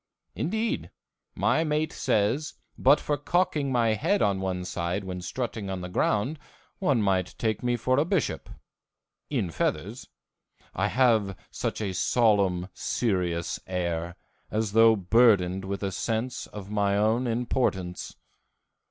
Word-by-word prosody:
Indeed, 220 Hz, +6 st, -2 dB, 0.5 s
my 160 Hz, -, +2 dB
mate 155 Hz, 0 st, 0 dB
says 115 Hz, +9 st, 0 dB, 0.2 s
but 140 Hz, +3 st, +5 dB
for 145 Hz, -, -1 dB
cocking 150 Hz, -2 st, 0 dB
my 120 Hz, -3 st, +2 dB
head 110 Hz, -, +1 dB
on 100 Hz, -2 st, +1 dB
one 90 Hz, -1 st, -2 dB
side 90 Hz, +2 st, -2 dB
when 90 Hz, -1 st, -5 dB
strutting 110 Hz, 0 st, -4 dB
on 95 Hz, -1 st, -3 dB
the 90 Hz, -, -6 dB
ground 105 Hz, -, 0 dB, 0.4 s
one 140 Hz, -, +2 dB
might 95 Hz, -2 st, 0 dB
take 110 Hz, -3 st, -1 dB
me 120 Hz, -1 st, 0 dB
for 130 Hz, +3 st, +1 dB
a -, -, +4 dB
bishop 180 Hz, -3 st, -1 dB, 0.8 s
in 115 Hz, -, -1 dB
feathers 80 Hz, -, -2 dB, 0.7 s
I 95 Hz, +3 st, 0 dB
have 110 Hz, -6 st, +2 dB
such -, -, -3 dB
a 100 Hz, -3 st, -2 dB
solemn, 95 Hz, -3 st, +2 dB
serious 90 Hz, -7 st, -1 dB
air, 85 Hz, -1 st, -2 dB, 0.3 s
as 110 Hz, -1 st, -1 dB
though 115 Hz, +1 st, +6 dB
burdened 95 Hz, -2 st, +3 dB
with 100 Hz, +1 st, -4 dB
a 100 Hz, -, -1 dB
sense 115 Hz, +5 st, -2 dB
of 100 Hz, -1 st, -9 dB
my 100 Hz, -1 st, +1 dB
own 110 Hz, +4 st, +2 dB
importance. 115 Hz, -6 st, -1 dB
105 Hz, 135 wpm, -27 LUFS, 95-125 Hz, 0.8 s, though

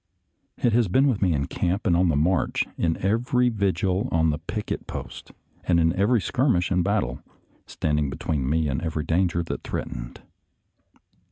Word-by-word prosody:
It 120 Hz, -, +1 dB
has 115 Hz, -2 st, +3 dB
been 130 Hz, +10 st, +3 dB
with 125 Hz, -7 st, +1 dB
me 95 Hz, -3 st, +3 dB
in 70 Hz, -2 st, 0 dB
camp 90 Hz, +7 st, -2 dB
and 90 Hz, -4 st, +3 dB
on 90 Hz, 0 st, +3 dB
the 80 Hz, -, +2 dB
march, 85 Hz, +5 st, +1 dB
in 80 Hz, -1 st, 0 dB
every 125 Hz, +4 st, +2 dB
vigil 95 Hz, -3 st, 0 dB
on 80 Hz, -1 st, +3 dB
the 75 Hz, -, -3 dB
picket 105 Hz, +6 st, -5 dB
post, -, -, -8 dB, 0.3 s
and 85 Hz, -2 st, +2 dB
in 80 Hz, 0 st, +3 dB
every 110 Hz, +5 st, +3 dB
skirmish 120 Hz, -6 st, +1 dB
and 90 Hz, -1 st, +2 dB
battle, 100 Hz, -, -1 dB, 0.5 s
standing 75 Hz, -2 st, -1 dB
between 70 Hz, 0 st, -2 dB
me 80 Hz, +1 st, +1 dB
and 65 Hz, -1 st, -2 dB
every 80 Hz, -2 st, -2 dB
danger 85 Hz, +1 st, +1 dB
that 80 Hz, -, -5 dB
threatened. -, -, -6 dB
90 Hz, 170 wpm, -25 LUFS, 80-105 Hz, 0.5 s, has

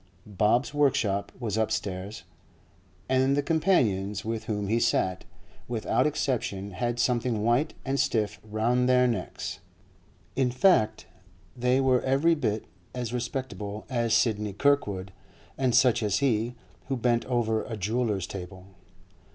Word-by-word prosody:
Bob's 105 Hz, +7 st, +1 dB
workshop 115 Hz, -9 st, +1 dB
was 110 Hz, -4 st, -2 dB
upstairs, 100 Hz, -2 st, -2 dB, 0.8 s
and 130 Hz, +2 st, +2 dB
the 145 Hz, -, +1 dB
companions 110 Hz, -, +1 dB
with 115 Hz, 0 st, -3 dB
whom 105 Hz, -2 st, -2 dB
he 115 Hz, +3 st, +2 dB
sat, 95 Hz, -4 st, 0 dB, 0.4 s
without 120 Hz, +4 st, +1 dB
exception, 115 Hz, -9 st, -2 dB
had 120 Hz, +6 st, -2 dB
something 120 Hz, -2 st, 0 dB
white 120 Hz, +7 st, +1 dB
and 135 Hz, +1 st, -1 dB
stiff 105 Hz, -6 st, 0 dB
round 115 Hz, +4 st, +1 dB
their 125 Hz, 0 st, +5 dB
necks; 115 Hz, -7 st, -3 dB, 0.8 s
in 130 Hz, -1 st, +2 dB
fact, 120 Hz, -, +3 dB, 0.5 s
they 125 Hz, +1 st, +2 dB
were 130 Hz, -2 st, +3 dB
every 140 Hz, +6 st, +3 dB
bit 110 Hz, -9 st, -1 dB, 0.3 s
as 120 Hz, -2 st, -3 dB
respectable 115 Hz, -4 st, -4 dB
as 115 Hz, -2 st, 0 dB
Sidney 105 Hz, -3 st, +1 dB
Kirkwood, 100 Hz, -7 st, +1 dB, 0.4 s
and 130 Hz, -3 st, +1 dB
such 125 Hz, -2 st, +4 dB
as 105 Hz, -2 st, +1 dB
he, 120 Hz, -3 st, 0 dB, 0.3 s
who 135 Hz, 0 st, -1 dB
bent 120 Hz, -1 st, +1 dB
over 115 Hz, -3 st, 0 dB
a 110 Hz, -, -5 dB
jeweller's 105 Hz, -1 st, -1 dB
table. 95 Hz, 0 st, -8 dB
115 Hz, 130 wpm, -27 LUFS, 105-130 Hz, 0.8 s, their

